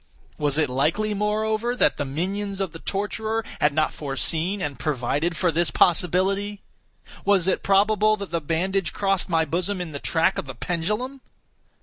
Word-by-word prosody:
Was 145 Hz, -1 st, +1 dB
it 155 Hz, -2 st, +3 dB
likely, 160 Hz, +12 st, 0 dB
moreover, 215 Hz, +3 st, 0 dB
that -, -, +2 dB
the 145 Hz, -, -2 dB
minions 195 Hz, +8 st, -3 dB
of 190 Hz, -4 st, -2 dB
the 165 Hz, -, -9 dB
torturer 220 Hz, +4 st, -2 dB
had 150 Hz, -, +3 dB
not 155 Hz, +1 st, +1 dB
foreseen 155 Hz, -, 0 dB
and 145 Hz, -6 st, -4 dB
provided 150 Hz, +4 st, -1 dB
for 175 Hz, 0 st, +2 dB
this 170 Hz, +2 st, +2 dB
possibility? 195 Hz, +3 st, +2 dB, 0.6 s
Was 195 Hz, -3 st, +3 dB
it 190 Hz, -, +1 dB
probable 215 Hz, +2 st, +3 dB
that 200 Hz, -4 st, -7 dB
the 170 Hz, -1 st, -1 dB
bandage 175 Hz, +4 st, -1 dB
crossed 195 Hz, -2 st, 0 dB
my 165 Hz, -2 st, +2 dB
bosom 180 Hz, +5 st, -1 dB
in 175 Hz, -3 st, -5 dB
the 140 Hz, -, -5 dB
track 165 Hz, +5 st, +1 dB
of -, -, -6 dB
the 130 Hz, -, -7 dB
pendulum? 210 Hz, -, -3 dB
185 Hz, 165 wpm, -24 LUFS, 160-205 Hz, 0.6 s, it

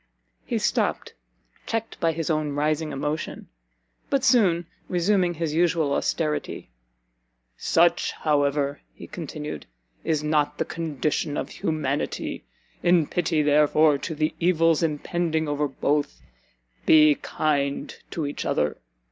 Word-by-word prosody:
He -, -, 0 dB
stopt, -, -, 0 dB, 0.5 s
checked 225 Hz, 0 st, -3 dB
by 165 Hz, -, +2 dB
his 165 Hz, 0 st, -2 dB
own 155 Hz, -2 st, -1 dB
rising 150 Hz, +1 st, 0 dB
emotion; 150 Hz, +3 st, -4 dB, 0.6 s
but 275 Hz, -2 st, +1 dB
soon 190 Hz, -10 st, +4 dB, 0.2 s
resuming 180 Hz, 0 st, +2 dB
his 160 Hz, -1 st, -2 dB
usual 165 Hz, -3 st, +2 dB
austerity, 150 Hz, -, -2 dB, 0.8 s
"Such, 170 Hz, -, +2 dB
however," 145 Hz, -1 st, 0 dB
he -, -, -10 dB
continued, 150 Hz, -, -7 dB, 0.4 s
"is 155 Hz, -2 st, 0 dB
not 150 Hz, -1 st, +1 dB
the -, -, -1 dB
condition 155 Hz, -2 st, -2 dB
of -, -, -3 dB
humanity; 150 Hz, -3 st, -2 dB, 0.4 s
in 175 Hz, -2 st, +4 dB
pity, 160 Hz, -1 st, 0 dB
therefore, 150 Hz, 0 st, +4 dB
to 160 Hz, -, -4 dB
the 155 Hz, +1 st, 0 dB
evils 165 Hz, -2 st, +3 dB
impending 160 Hz, 0 st, -1 dB
over 145 Hz, 0 st, 0 dB
both, 145 Hz, +1 st, -1 dB, 0.7 s
be 155 Hz, -1 st, +7 dB
kind 140 Hz, -1 st, -1 dB
to 160 Hz, -, -3 dB
each 145 Hz, -, -4 dB
other! 75 Hz, 0 st, 0 dB
155 Hz, 120 wpm, -25 LUFS, 145-170 Hz, 0.8 s, be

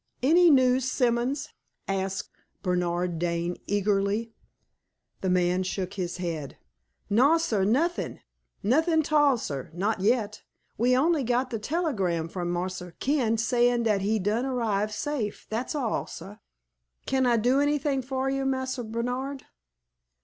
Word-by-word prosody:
"Any 340 Hz, +5 st, +6 dB
news, 260 Hz, -2 st, +4 dB
Simons?" 250 Hz, +4 st, 0 dB, 0.4 s
asked 195 Hz, 0 st, -2 dB, 0.3 s
Bernard 175 Hz, -2 st, 0 dB
Dane, 170 Hz, 0 st, -1 dB
eagerly. 205 Hz, +2 st, 0 dB, 0.9 s
The 190 Hz, -, -1 dB
man 180 Hz, 0 st, +2 dB
shook 185 Hz, 0 st, -3 dB
his 180 Hz, -3 st, -3 dB
head. 165 Hz, -6 st, -4 dB, 0.5 s
"No, 265 Hz, +10 st, +4 dB
sah; 225 Hz, -12 st, 0 dB
nothing 290 Hz, -, 0 dB, 0.4 s
nothing 315 Hz, -, +3 dB
'tall, 295 Hz, -3 st, +4 dB
sah 140 Hz, -, -4 dB
not 200 Hz, +5 st, -1 dB
yet. 215 Hz, 0 st, +1 dB, 0.3 s
We 250 Hz, +3 st, +3 dB
only 310 Hz, +1 st, +2 dB
got 250 Hz, +2 st, 0 dB
de 225 Hz, -, -2 dB
tellygram 205 Hz, -, -1 dB
from 175 Hz, -2 st, -3 dB
Marse 180 Hz, +1 st, -2 dB, 0.2 s
Ken 255 Hz, -5 st, +1 dB
sayin' 240 Hz, +1 st, +2 dB
dat 210 Hz, -3 st, +2 dB
he 210 Hz, +3 st, +1 dB
done 215 Hz, +6 st, 0 dB
arrive 215 Hz, -5 st, 0 dB
safe 220 Hz, -1 st, -3 dB
dat's 235 Hz, +7 st, -2 dB
all, 250 Hz, -7 st, -1 dB
sah. -, -, -9 dB, 0.7 s
Kin 265 Hz, -1 st, +1 dB
I 240 Hz, -1 st, +4 dB
do 250 Hz, +5 st, +3 dB
anything 290 Hz, -1 st, +1 dB
for 260 Hz, +1 st, -2 dB
you, 270 Hz, 0 st, 0 dB
Marse 260 Hz, -1 st, -1 dB
Bernard?" 250 Hz, +5 st, -3 dB
230 Hz, 135 wpm, -27 LUFS, 195-265 Hz, 0.9 s, Any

